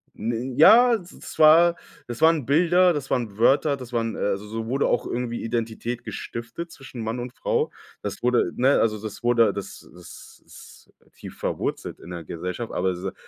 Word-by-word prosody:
N 120 +3 -3
ja, 235 +8 +7
d 190 - -12 0.2
das - - -10
war 165 +2 +7 0.3
das 120 +4 -7
waren 160 -5 +4
Bilder, 175 +4 +4
das 140 -3 -5
waren 110 -5 -2
Wörter, 140 +4 +3
das 125 -2 -11
waren 115 -1 -1
äh - - -7
also, 100 +1 -2
so 110 +1 -5
wurde 135 +3 0
auch - - 0
irgendwie 120 -1 -3
Identität 115 +1 -3
gestiftet 120 +9 -7
zwischen 130 -3 -10
Mann 115 +2 -3
und 125 0 -6
Frau. - - -1 0.3
Das 100 +2 -6
wurde, 125 0 +2
ne 135 +3 +3
also, 110 -2 +1
das 110 +1 -8
wurde, 115 -4 +3
das 100 - -8
das 90 0 -14
ist - - -16 0.2
tief - - -11
verwurzelt - - -4
in 90 - -12
der 85 -2 -6
Gesellschaft. 90 +9 -5
Aber 95 0 0
se 95 +2 -5
120 Hz, 185 wpm, -24 LUFS, 110-140 Hz, 0.3 s, ja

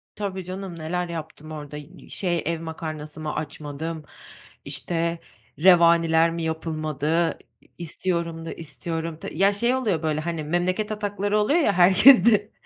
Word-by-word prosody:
Tabii 190 -2 -4
canım, 185 -1 -7
neler 175 +3 -2
yaptım 160 -1 -7
orada 150 -1 -7
y 150 +2 -13
şey 175 -4 -1
ev 165 0 -2
makarnası 155 -2 -6
mı 155 -1 -3
açmadım, 155 +1 -5 0.6
işte, 165 +4 -2 0.4
revaniler 170 -1 +5
mi 165 0 -4
yapılmadı, 160 0 -1 0.2
i - - -27
i - - -26
istiyorum 170 -1 -3
da - - -5
istiyorum 165 0 -5
ta - - -7
Ya, 200 +1 +3
şey 235 +5 +2
oluyor 210 - -1
böyle, 155 -1 0
hani, 165 -1 -3
memleket 185 +7 -1
atakları 205 -1 -1
oluyor 280 +11 +3
ya 250 -11 +2
herkesde. 205 +3 +6
165 Hz, 145 wpm, -24 LUFS, 155-190 Hz, 0.6 s, herkesde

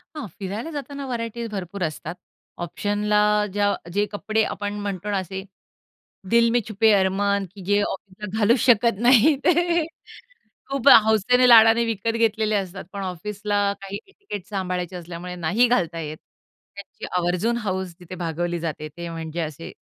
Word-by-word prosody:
हां, 300 -7 -5
फिरायला 205 - -5
जाताना 280 -1 -6
व्हरायटीज 235 -1 -4
भरपूर 195 -1 -5
असतात. 160 +1 -4 0.5
ऑप्शनला 205 +4 0 0.3
ज्या 205 0 +2 0.2
जे 205 +2 +2
कपडे 215 +1 0
आपण 205 -1 -3
म्हणतो 205 -1 -4
ना 200 - +1
असे 190 +1 -5 0.9
दिल 235 0 +5
मे 240 +1 +3
छुपे 220 +1 +3
अरमान, 200 +1 +2
की 195 - -10
जे 205 +2 +2
ऑफिसला 200 +1 -5
घालू 225 +3 +4
शकत 230 -3 +4
नाहीत 265 +4 +6
ते 345 -1 +3 0.9
खूप 275 0 +2 0.2
हौसेने 245 +4 +4
लाडाने 225 0 +7
विकत 225 0 -1
घेतलेले 220 -1 +1
असतात. 190 -2 -4
पण 200 - -5
ऑफिसला 205 +2 -1
काही 195 +1 -6
एटिकेट 390 - -9
सांभाळायचे 185 -3 -3
असल्यामुळे 175 +1 -7
नाही 180 +9 +2
घालता 175 -8 0
येत. 155 -1 -5 0.6
त्यांची 200 0 -9
आवर्जून 180 +7 0
हौस 185 -2 -2
तिथे 180 0 -9
भागवली 175 0 -2
जाते. 155 -2 -4
ते 170 0 -6
म्हणजे 165 0 -5
असे 155 0 -5
205 Hz, 150 wpm, -23 LUFS, 180-225 Hz, 0.9 s, लाडाने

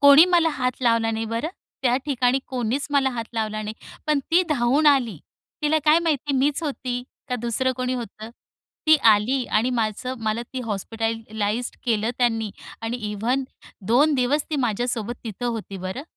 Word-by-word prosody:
कोणी 285 +3 +9
मला 345 -2 +4
हात 255 -2 -2
लावला 230 -2 +3
नाही 225 0 -2
बरं. 230 +7 -2 0.3
त्या 250 -1 +3
ठिकाणी 255 -2 +2
कोणीच 255 +2 -1
मला 275 -2 +3
हात 235 -2 -4
लावला 215 -1 -2
नाही, 215 +1 -5 0.3
पण 300 -1 +3
ती 350 +3 +5
धावून 280 +2 +2
आली. 250 - +3 0.4
तिला 310 +1 +3
काय 305 +2 +6
माहिती 295 -4 0
मीच 285 +4 +1
होती? 255 -4 -3 0.3
का 250 - -1
दुसरं 250 +2 0
कोणी 255 0 -1
होतं? 225 -2 -7 0.6
ती 315 0 +8
आली 235 +5 +2
आणि 240 +4 +1
माझं 235 +2 -1
मला 220 +1 -1
ती 260 - -3
हॉस्पिटलाइज्ड 225 +1 -3
केलं 225 -1 +1
त्यांनी 225 -3 +1 0.3
आणि 225 +2 -2
इव्हन 240 +6 0 0.4
2 285 +8 +4
दिवस 275 +3 +1
ती 305 - 0
माझ्यासोबत 240 -2 -1
तिथं 230 +2 -4
होती 225 -4 -4
बरं. 185 +8 -5
245 Hz, 165 wpm, -24 LUFS, 225-275 Hz, 0.6 s, कोणी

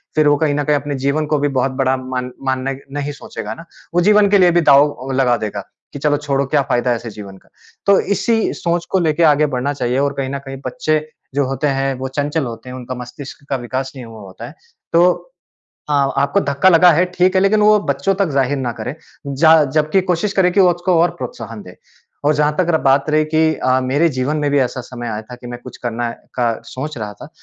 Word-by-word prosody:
फिर 155 -1 +4
वो 145 - +5
कहीं 150 -1 +1
न 145 - 0
कहीं 150 0 +2
अपने 145 0 -4
जीवन 150 +2 +1
को 150 - +2
भी 145 - +1
बहुत 135 +1 +1
बड़ा 130 0 +2
मान 130 -1 -4
मान्य 130 0 -1 0.2
नहीं 145 0 -3
सोचेगा 105 - -6
ना। 165 - -12 0.3
वो 175 - +4
जीवन 210 -1 +5
के 205 - +6
लिए 180 -1 +5
भी 175 0 +3
दाव 140 -1 +3
लगा 130 -2 +2
देगा, 100 -1 -5 0.3
कि 140 - -6
चलो 145 0 +1
छोड़ो 140 -2 -1
क्या 145 +2 +2
फ़ायदा 120 0 +1
ऐसे 115 0 -5
जीवन 100 -2 -10
का। - - -25 0.4
तो 200 -1 +6
इसी 225 +2 0
सोच 170 0 -2
को 190 - +3
लेके 165 -1 +1
आगे 150 +1 +2
बढ़ना 135 +3 -1
चाहिए 125 -1 -1
और 140 0 0
कहीं 135 -1 -2
न - - -3
कहीं 135 0 -6
बच्चे, 155 -12 0 0.4
जो 140 -1 +2
होते 135 +3 -1
हैं 135 -1 0
वो 130 - -3
चंचल 145 +1 -1
होते 115 +1 -8
हैं, 125 - -7
उनका 130 0 -6
मस्तिष्क 125 +3 -10
का 135 - 0
विकास 130 +2 -4
नहीं 130 -2 -8
हुआ 115 -1 -11
होता 95 -2 -10
है। - - -13 0.4
तो 175 - +3 0.6
अ, - - +1
आपको 140 +4 +1
धक्का 140 +2 +2
लगा 175 +1 +7
है, 165 +3 +3
ठीक 185 +1 +2
है - - +4
लेकिन 205 +2 +3
वो 210 0 +5
बच्चों 140 +8 +1
तक 195 -2 +1
ज़ाहिर 140 0 +1
ना 125 -3 -2
करे, 125 +3 -6 0.3
जा 160 +3 +5
जबकि 155 +5 +3
कोशिश 180 +4 0
करें 185 -2 +3
कि 200 - +3
उसको 180 0 +3
और 175 - +3
प्रोत्साहन 115 -3 -7
दें। 90 -1 -13 0.5
और 150 +1 +3
जहाँ 150 0 +1
तक 180 - +1
र 160 - +3
बात 135 +2 +3
रही 155 0 +3
कि 160 0 +3
अ, 130 -2 +1
मेरे 145 +6 +2
जीवन 140 +4 0
में 145 -1 0
भी 145 - +3
ऐसा 130 0 -1
समय 120 -1 -7
आया 110 -1 -4
था 125 +3 -11
कि 120 - -12
मैं 120 0 -7
कुछ 125 - -10
करने 120 0 -2 0.2
का 120 -2 +1 0.2
सोच 145 +1 -5
रहा 105 -2 -5
था, - - -12
140 Hz, 235 wpm, -18 LUFS, 130-160 Hz, 0.6 s, लगा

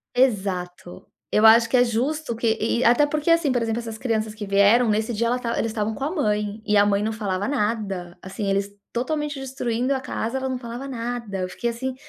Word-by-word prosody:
Exato. 190 -8 -1 0.3
Eu 210 - +3
acho 230 +1 +7
que 230 - 0
é 245 - +6
justo 250 +4 -1
que 225 0 +1
e 235 +2 +1
até 245 +5 +5
porque 305 +2 0
assim, 330 -4 +3
por 250 - +1
exemplo, 225 0 -1
essas 225 -2 -6
crianças 220 -3 -2
que 215 -1 -6
vieram 200 +5 +4
nesse 220 +2 0
dia, 230 +2 0
ela 240 +2 +1
estava 235 -2 -3
eles 225 - -1
estavam 215 0 -2
com 270 - -5
a 295 - -1
mãe 210 - -1
e 210 -2 +2
a 205 - +6
mãe 200 0 +2
não 215 +1 -1
falava 205 -3 -2
nada. 205 -8 -2
Assim, 195 +2 -5
eles 195 +1 0 0.2
totalmente 295 +3 -2
destruindo 255 -1 -1
a - - -1
casa, 260 -1 -3
ela 265 0 -2
não 260 -1 -3
falava 240 +2 -7
nada. 235 -5 -4
Eu 185 0 -2
fiquei, 235 +6 -2
assim, 255 +2 -4
230 Hz, 225 wpm, -23 LUFS, 210-255 Hz, 0.3 s, acho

